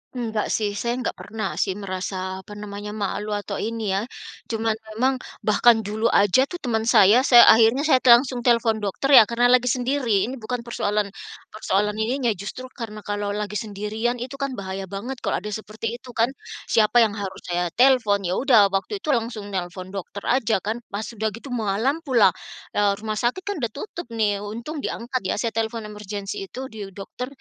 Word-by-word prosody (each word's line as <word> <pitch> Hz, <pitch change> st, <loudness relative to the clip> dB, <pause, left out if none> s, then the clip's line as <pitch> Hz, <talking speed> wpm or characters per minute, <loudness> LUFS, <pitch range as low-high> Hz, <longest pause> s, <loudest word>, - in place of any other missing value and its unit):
Enggak 225 Hz, -3 st, -2 dB
sih, 210 Hz, -2 st, 0 dB
saya 235 Hz, +4 st, -2 dB
enggak -, -, -3 dB
pernah 205 Hz, +2 st, -4 dB
sih 190 Hz, -, 0 dB
merasa, 185 Hz, -1 st, -4 dB
apa 205 Hz, +2 st, -11 dB
namanya, 205 Hz, 0 st, -7 dB
malu 210 Hz, 0 st, -2 dB
atau 205 Hz, -1 st, -4 dB
ini 225 Hz, -2 st, -2 dB
ya, 195 Hz, +4 st, -1 dB, 0.4 s
cuman 225 Hz, 0 st, 0 dB, 0.2 s
memang 260 Hz, +3 st, +1 dB, 0.2 s
bahkan 225 Hz, +1 st, +4 dB
dulu 215 Hz, +3 st, -1 dB
aja 220 Hz, +6 st, +4 dB
tuh 355 Hz, -, -7 dB
teman 225 Hz, -3 st, -1 dB
saya 215 Hz, -1 st, +6 dB
saya 240 Hz, -2 st, +9 dB
akhirnya 225 Hz, +5 st, +6 dB
saya 300 Hz, -4 st, +4 dB
langsung 250 Hz, +1 st, +6 dB
telepon 235 Hz, -2 st, +2 dB
dokter 210 Hz, +7 st, -2 dB
ya 230 Hz, -6 st, +9 dB
karena 240 Hz, +1 st, +3 dB
lagi 250 Hz, 0 st, +4 dB
sendiri 250 Hz, -5 st, +1 dB
ini 255 Hz, +3 st, -4 dB
bukan 235 Hz, +2 st, -4 dB
persoalan 210 Hz, -3 st, -1 dB, 0.4 s
persoalan 210 Hz, -1 st, 0 dB
ininya 240 Hz, +2 st, +1 dB
justru 215 Hz, +6 st, -7 dB
karena 215 Hz, -4 st, -8 dB
kalau 205 Hz, 0 st, -3 dB
lagi 210 Hz, 0 st, -3 dB
sendirian 215 Hz, +3 st, -2 dB
itu 250 Hz, +3 st, -7 dB
kan 275 Hz, -2 st, -2 dB
bahaya 190 Hz, -2 st, -5 dB
banget 220 Hz, +7 st, -6 dB
kalau 185 Hz, -, -2 dB
ada 210 Hz, -, -5 dB
seperti 220 Hz, +2 st, -5 dB
itu 250 Hz, 0 st, -13 dB
kan. 230 Hz, +2 st, +2 dB, 0.4 s
Siapa 230 Hz, +2 st, +5 dB
yang 220 Hz, -, +1 dB
harus 200 Hz, -3 st, -6 dB
saya 175 Hz, 0 st, -1 dB
telepon, 235 Hz, -6 st, +4 dB
ya 180 Hz, 0 st, -1 dB
udah 225 Hz, -7 st, +5 dB
waktu 195 Hz, -, -2 dB
itu 305 Hz, -, 0 dB
langsung 225 Hz, -5 st, -2 dB
nelpon 185 Hz, 0 st, -5 dB
dokter 200 Hz, +1 st, -7 dB
aja 230 Hz, -6 st, +1 dB
kan 220 Hz, +3 st, -2 dB
pas 200 Hz, +2 st, -4 dB
udah 220 Hz, -1 st, -3 dB
gitu 250 Hz, +4 st, -10 dB
malam 230 Hz, +5 st, 0 dB
pula, 250 Hz, -, +4 dB, 0.4 s
eee, 205 Hz, -1 st, +2 dB
rumah 215 Hz, -1 st, -2 dB
sakit 250 Hz, +11 st, -1 dB
kan 405 Hz, -4 st, -3 dB
udah 235 Hz, -4 st, -2 dB
tutup 340 Hz, -, -7 dB
nih 205 Hz, -3 st, +1 dB
untung 230 Hz, +9 st, -6 dB
diangkat 255 Hz, -1 st, -3 dB
ya -, -, 0 dB
saya 225 Hz, +2 st, -1 dB
telepon 225 Hz, 0 st, -2 dB
emergency 205 Hz, -2 st, -6 dB
itu 260 Hz, +3 st, -7 dB
di 210 Hz, -2 st, -7 dB
dokter, 210 Hz, +5 st, -6 dB
220 Hz, 185 wpm, -23 LUFS, 205-245 Hz, 0.4 s, saya